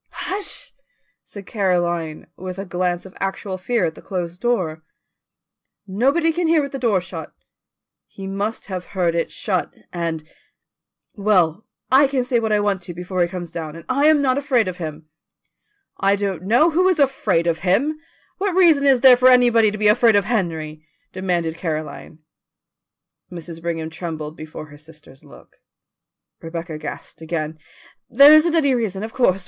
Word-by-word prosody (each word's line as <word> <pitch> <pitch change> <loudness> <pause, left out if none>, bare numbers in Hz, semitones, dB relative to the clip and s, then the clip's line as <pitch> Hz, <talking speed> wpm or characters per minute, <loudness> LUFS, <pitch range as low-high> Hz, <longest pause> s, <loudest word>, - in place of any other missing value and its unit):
"Hush!" 400 +1 -4 0.5
said 200 -2 -11
Caroline, 175 -6 -1
with 185 0 -7
a 195 - -5
glance 180 -1 -2
of 190 - -13
actual 195 0 -4
fear 225 0 0
at 160 - -2
the - - -14
closed 180 -1 -5
door. 185 -10 -1 1.0
"Nobody 275 - +1
can 345 0 0
hear 325 0 +4
with 280 - -5
the 270 - -5
door 225 -6 +2
shut." 180 - -8 0.8
"He 195 - -10
must 200 +3 -3
have 185 -3 -5
heard 175 -2 +2
it 170 0 -1
shut, 185 -4 -3 0.2
and 165 -3 -3 0.5
" - - -45
"Well, 180 -2 +2 0.2
I 270 +2 +6
can 265 -2 0
say 245 -1 +1
what 220 -1 -2
I 210 - +3
want 205 -2 0
to 175 -1 -8
before 180 +1 -3
he 175 - +3
comes 175 -2 -7
down, 160 -2 -6
and 165 -1 -11
I 280 +3 +2
am 305 -2 +4
not 260 0 +2
afraid 260 -7 +1
of 180 -1 -4
him." 155 -2 -7 0.9
"I 195 +1 +3
don't 195 -4 -3
know 245 - +4
who 365 +4 +3
is 365 - +1
afraid 260 - +1
of 165 -1 0
him! 275 - +1 0.4
What 390 -2 -1
reason 320 -7 +5
is 265 -3 +4
there 255 -1 +9
for 255 +1 +5
anybody 240 -3 +5
to 210 - -5
be 210 0 +2
afraid 225 +1 +5
of 200 -1 +3
Henry?" 160 -8 -2 0.3
demanded 175 -3 -2
Caroline. 155 -1 -5 1.1
Mrs. 170 -1 -9
Brigham 165 -1 -3
trembled 160 -2 -6
before 155 -1 -9
her 145 0 -14
sister's 155 -3 -16
look. - - -17 0.8
Rebecca 165 -1 -6
gasped 155 - -8
again. 160 -1 -4 0.5
"There 285 +2 +8
isn't 320 +2 +5
any 285 -5 +3
reason, 215 -5 -2
of 225 +1 -6
course. 195 -7 +2
190 Hz, 170 wpm, -21 LUFS, 170-245 Hz, 1.1 s, there